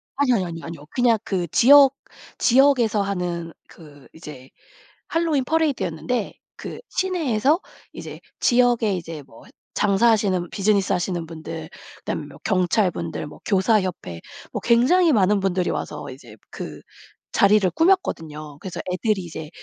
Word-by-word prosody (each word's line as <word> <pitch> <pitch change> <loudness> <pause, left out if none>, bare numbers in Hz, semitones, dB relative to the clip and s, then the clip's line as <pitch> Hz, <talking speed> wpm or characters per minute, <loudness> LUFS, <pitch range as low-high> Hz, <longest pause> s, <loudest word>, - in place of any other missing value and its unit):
아니요 270 -3 +2
아니요 190 -4 0
아니요 165 -1 -7
아니요. 165 -3 -9
그냥 240 -3 +3
그 180 -3 -2
지역 275 - +6 0.4
지역에서 245 -5 +3
하는 175 -4 -3
그 145 -4 -16
이제 150 -5 -11 0.6
핼러윈 325 -5 +1
퍼레이드였는데 250 - -1 0.2
그 - - -8
시내에서 315 - +1 0.3
이제 - - -9 0.2
지역에 240 -4 +3
이제 165 -4 -7
뭐 115 -4 -17
했 - - -18 0.3
장사하시는 200 -3 +2
비즈니스 200 -1 +1
하시는 175 -2 -1
분들 160 0 -8 0.3
그다음에 - - -4
뭐 - - -13
경찰분들 180 -4 0
뭐 - - -13
교사 205 +2 +3
협회 175 - -5 0.3
뭐 - - -3
굉장히 290 +9 +4
많은 205 -2 +3
분들이 185 -2 0
와서 - - -4
이제 125 -5 -13
그 - - -8 0.5
자리를 200 -1 +4
꾸몄거든요. 160 - 0
그래서 185 +1 -6
애들이 200 +2 0
이제 160 -2 -8
195 Hz, 330 characters per minute, -22 LUFS, 165-245 Hz, 0.6 s, 지역